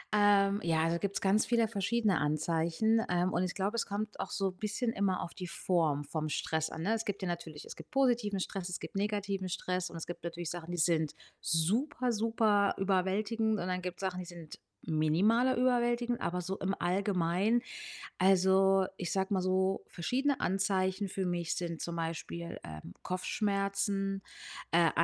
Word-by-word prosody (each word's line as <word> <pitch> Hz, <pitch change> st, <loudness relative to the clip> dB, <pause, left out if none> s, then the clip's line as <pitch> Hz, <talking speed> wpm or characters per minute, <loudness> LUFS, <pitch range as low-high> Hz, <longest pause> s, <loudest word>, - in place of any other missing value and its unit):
Ähm, 200 Hz, -1 st, +4 dB
ja, 165 Hz, -1 st, +2 dB
da 170 Hz, +1 st, 0 dB
gibt's 200 Hz, +1 st, -2 dB
ganz 200 Hz, +2 st, +4 dB
viele 230 Hz, -2 st, +3 dB
verschiedene 205 Hz, -2 st, +1 dB
Anzeichen, 165 Hz, +8 st, +1 dB
ähm, 180 Hz, +1 st, +1 dB
und -, -, +1 dB
ich 180 Hz, -, -2 dB
glaube, 200 Hz, +3 st, -1 dB
es 230 Hz, -, 0 dB
kommt 210 Hz, +1 st, -4 dB
auch -, -, -3 dB
so 195 Hz, -1 st, -1 dB
bisschen 215 Hz, +5 st, -2 dB
immer 195 Hz, -3 st, 0 dB
auf 170 Hz, -, -7 dB
die 180 Hz, -, -6 dB
Form 165 Hz, -4 st, +1 dB
vom 155 Hz, +1 st, -3 dB
Stress 160 Hz, +1 st, -1 dB
an, 160 Hz, -, -6 dB
ne? 210 Hz, +5 st, +2 dB
Es 225 Hz, 0 st, -2 dB
gibt 200 Hz, -1 st, -3 dB
ja -, -, -1 dB
natürlich 165 Hz, -3 st, -5 dB
es -, -, -9 dB
gibt -, -, -12 dB
positiven 240 Hz, -7 st, +2 dB
Stress, 185 Hz, -1 st, -3 dB
es 180 Hz, -, -4 dB
gibt -, -, -8 dB
negativen 200 Hz, -2 st, -1 dB
Stress 180 Hz, +1 st, -2 dB
und 165 Hz, -, -8 dB
es 165 Hz, -, -5 dB
gibt 175 Hz, -, -7 dB
natürlich 170 Hz, -1 st, -4 dB
Sachen, 175 Hz, -1 st, -6 dB
die 175 Hz, -, -3 dB
sind 160 Hz, -2 st, +2 dB, 0.3 s
super, 240 Hz, -, +1 dB
super 215 Hz, -2 st, +2 dB
überwältigend 205 Hz, +4 st, +1 dB
und 180 Hz, -, -3 dB
dann 185 Hz, 0 st, -1 dB
gibt's 180 Hz, 0 st, -5 dB
Sachen, 185 Hz, -1 st, -2 dB
die 180 Hz, -, -5 dB
sind 170 Hz, -3 st, -10 dB, 0.3 s
minimaler 195 Hz, +12 st, +3 dB
überwältigend, 240 Hz, -1 st, +2 dB
aber 180 Hz, +1 st, -1 dB
so 190 Hz, +2 st, -3 dB
im 195 Hz, 0 st, -1 dB
Allgemeinen, 190 Hz, +4 st, +1 dB, 0.6 s
also, 190 Hz, +1 st, +5 dB
ich 180 Hz, -3 st, -4 dB
sage 190 Hz, +1 st, 0 dB
mal 190 Hz, -, +2 dB
so, 190 Hz, +1 st, +1 dB
verschiedene 265 Hz, +10 st, 0 dB
Anzeichen 190 Hz, +1 st, +1 dB
für 190 Hz, 0 st, -2 dB
mich 175 Hz, -2 st, -1 dB
sind 170 Hz, -2 st, -3 dB
zum 170 Hz, 0 st, -4 dB
Beispiel, 165 Hz, +1 st, -4 dB
ähm, 80 Hz, +2 st, -9 dB
Kopfschmerzen, 195 Hz, +1 st, -1 dB, 0.5 s
äh, 170 Hz, 0 st, +5 dB
190 Hz, 175 wpm, -32 LUFS, 170-205 Hz, 0.6 s, also